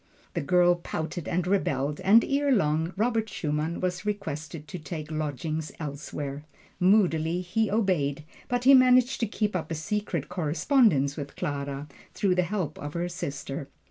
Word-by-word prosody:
The - - -1
girl 175 +3 +4
pouted 165 -1 -5
and 180 0 0
rebelled, 150 -7 0
and 205 +5 +6
erelong 195 - +1
Robert 225 0 +1
Schumann 155 -1 -2
was 180 0 -2
requested 160 -7 -4
to 180 - -6
take 155 0 -6
lodgings 155 +1 -3
elsewhere. 145 -1 -5 0.4
Moodily 180 -3 +3
he 215 +4 0
obeyed, 170 -9 +1 0.2
but 245 0 -1
he 270 +2 +8
managed 255 -1 +5
to 230 - +1
keep 210 -1 -1
up 160 -3 -2
a 165 - -2
secret 175 -1 -2
correspondence 165 - +2
with 140 -2 -6
Clara, 140 0 -3 0.3
through 195 -3 +2
the 180 - +2
help 175 -4 -3
of 145 +2 -6
her 175 +1 -1
sister. 145 -5 -5
170 Hz, 150 wpm, -27 LUFS, 150-200 Hz, 0.4 s, he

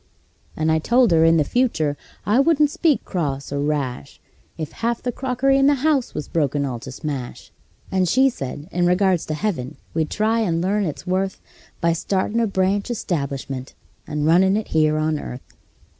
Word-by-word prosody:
And 155 0 +1
I 160 - +3
told 240 +5 +3
her 160 -1 +5
in 165 0 +5
the 155 - +4
future 155 - 0 0.3
I 215 +5 +3
wouldn't 295 0 +4
speak 310 -4 +1
cross 140 -8 -3
or 140 - -2
rash 140 - -3 0.4
If 155 -2 -5
half 235 0 -2
the 245 - -1
crockery 265 +2 +1
in 275 - +5
the 290 - +5
house 290 -6 +1
was 150 - -4
broken 145 -3 0
all 125 -3 -4
to 130 - -8
smash; 135 -2 -6 0.4
And 185 -2 +1
she 265 +6 +4
said, 145 - -5
in 175 0 +1
regards 180 -1 +2
to 155 - -2
heaven, 150 -8 -3 0.2
we'd 160 -1 0
try 220 +2 +1
and 175 -7 +1
learn 200 +3 +1
its 145 -2 -5
worth 190 +1 -1 0.4
By 170 0 +3
startin' 195 +6 -1
a 230 - +2
branch 195 +2 0
establishment 140 - -3 0.3
and 150 -1 -2
runnin' 190 +5 +4
it 220 - -4
here 155 -1 +2
on 155 0 0
earth. 125 -1 -9
170 Hz, 185 wpm, -22 LUFS, 150-220 Hz, 0.4 s, her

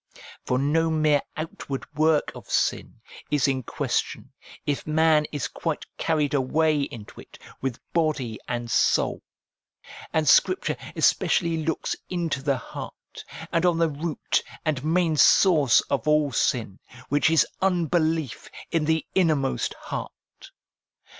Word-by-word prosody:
For 125 - 0
no 155 +5 +1
mere 155 -2 +2 0.2
outward 155 -3 -5
work 155 0 +2
of - - -12
sin - - -1 0.3
is 145 -2 +2
in 135 -1 0
question, - - -3 0.3
if 145 0 -2
man 155 0 +3
is 145 -3 -2
quite - - -4
carried 150 -3 0
away 150 +3 +2
into 115 -6 -7
it, - - -16 0.2
with 130 -2 -3
body 150 -9 0
and 120 -1 -3
soul. - - +2 0.9
And 155 -1 0
Scripture 370 - +4 0.2
especially 170 -2 +2
looks 160 +1 -2
into 170 -6 -2
the 140 -1 0
heart, - - -10 0.3
and 165 0 +1
on 175 -2 +3
the 165 -1 +2
root 155 +2 -1 0.2
and 145 -5 -1
main 165 0 +1
source 150 - +5
of 140 0 -3
all 150 -2 +3
sin, 110 -5 -1 0.3
which 145 +3 +3
is 165 -1 +4 0.2
unbelief 165 -6 0 0.2
in 165 -2 +1
the 160 0 +1
innermost 155 -7 +1
heart. - - -9
155 Hz, 130 wpm, -25 LUFS, 140-160 Hz, 0.9 s, source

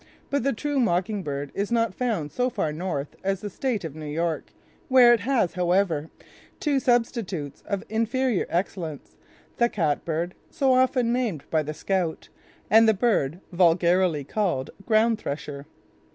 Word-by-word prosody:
But 280 - +1
the 275 +3 +1
true 285 +4 -1
mocking 205 -2 +1
bird 145 -3 -4
is 200 +3 -2
not 230 -3 +1
found 210 - -2
so 250 0 0
far 155 -10 -2
north 155 -4 -4
as 195 0 -1
the 205 - -5
state 240 -2 -2
of 160 -4 -5
New 155 -1 -7
York, 165 +1 -2 0.4
where 255 -4 +7
it 235 - +2
has, 230 -4 +1
however, 175 -3 +1 0.5
two 285 -3 +1
substitutes 230 - -1
of 200 -2 -2
inferior 230 0 0
excellence, 170 -3 -3 0.4
the 235 0 +3
catbird, 165 0 -1 0.2
so 270 -2 +2
often 255 -2 +3
named 225 - -1
by 160 - +3
the 155 0 -5
scout, 180 -3 -2 0.4
and 225 +1 +6
the 220 - +3
bird 185 - +1
vulgarly 175 -2 +3
called 165 -5 -1 0.2
ground 225 0 +3
thresher. 145 -4 -6
195 Hz, 150 wpm, -25 LUFS, 160-235 Hz, 0.5 s, where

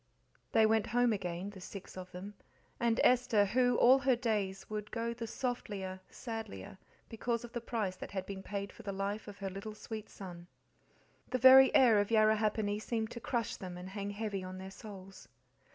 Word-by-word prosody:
They 220 - +5
went 220 0 +3
home 245 -1 +3
again, 185 0 -4
the 195 -2 -11
six 195 +1 -9
of 185 -1 -8
them, 190 +3 -8 0.5
and 235 -1 +2
Esther, 240 -4 +4
who, 245 +4 +3
all 260 +3 +7
her 265 -1 +3
days, 210 -5 -1
"would 210 -1 -5
go 235 0 -2
the 230 0 -6
softlier, 205 -7 -4
sadlier" 220 - -7 0.3
because 235 +1 -2
of 235 - -10
the 240 - -3
price 215 -6 -2
that - - -7
had 190 -2 -4
been 195 -1 -6
paid 200 +1 -5
for - - -12
the 200 - -4
life 200 +2 -3
of 205 -1 -9
her 195 -1 -4
little 200 +3 -7
sweet 215 0 -7
son. 175 -3 -9 0.8
The 255 - 0
very 260 +1 +9
air 230 -5 +7
of 205 - 0
Yarrahappini 215 -1 +2
seemed 220 -1 -2
to 235 - -6
crush 235 -2 -2
them 180 -2 -7
and 180 +1 -7
hang 200 0 -4
heavy 205 -2 -3
on 185 0 -7
their 190 +1 -8
souls. 195 -2 -11
210 Hz, 190 wpm, -33 LUFS, 195-230 Hz, 0.8 s, very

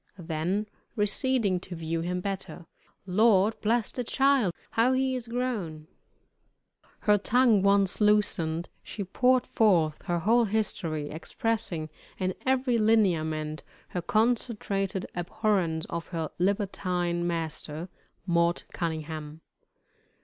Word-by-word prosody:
Then 175 +4 -2 0.3
receding 210 -2 +1
to 180 0 -8
view 165 0 -2
him 180 +2 -2
better, 190 -3 -5 0.4
"Lord 210 +2 +3
bless 225 +1 +1
de 250 - -3
child! 270 -5 +3 0.2
how 235 +3 +3
he 260 0 +1
is 245 -2 -5
grown!" 225 -11 -3 1.2
Her 210 -1 +4
tongue 235 -1 +4
once 200 0 +2
loosened, 175 -6 +2
she 205 - -6
poured 250 +6 +2
forth 170 -9 +2
her 175 - 0
whole 230 +7 +3
history, 170 -8 -1
expressing 165 +1 -2 0.3
in 185 -1 -1
every 255 -2 +2
lineament 160 -8 +1 0.3
her 180 - -3
concentrated 210 -2 0
abhorrence 175 -2 0
of 170 0 -5
her 165 -3 -4
libertine 180 -3 0
master, 165 -1 -4 0.4
"Mort 170 -1 +1
Cunningham." 160 -2 -4
190 Hz, 110 wpm, -28 LUFS, 165-220 Hz, 1.2 s, Her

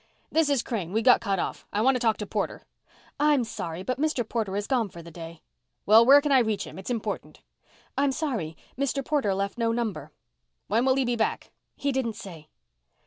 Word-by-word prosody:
"This 320 -2 +3
is 275 -4 +2
Crane. 195 -7 -4
We 225 +1 +1
got 250 0 +6
cut 200 -3 0
off. - - -4
I 205 - -1
want 265 +4 +4
to 250 - 0
talk 225 -2 +2
to 210 - -4
Porter." 205 0 -3 0.5
"I'm 295 -3 +4
sorry 180 -6 -5
but 255 +5 -2
Mr. 290 -7 0
Porter 220 -5 -2
has 205 0 -1
gone 240 -5 0
for 170 -2 -11
the 170 - -11
day." 165 0 -10 0.4
"Well, 220 +3 +8
where 275 +4 +8
can 295 0 -1
I 270 - +7
reach 220 -4 0
him? - - -9
It's 190 - -7
important." 230 -3 -4 0.5
"I'm 280 0 +2
sorry. 235 - -3 0.2
Mr. 275 0 -1
Porter 270 -11 +1
left 200 +4 -3
no 230 -1 +2
number." 230 -3 -3 0.5
"When 230 +4 +1
will 260 -1 +4
he 270 -1 +1
be 240 0 0
back?" 225 -1 -1 0.2
"He 280 - -1
didn't 250 -5 -1
say." 165 -6 -10
230 Hz, 210 wpm, -27 LUFS, 200-265 Hz, 0.5 s, Well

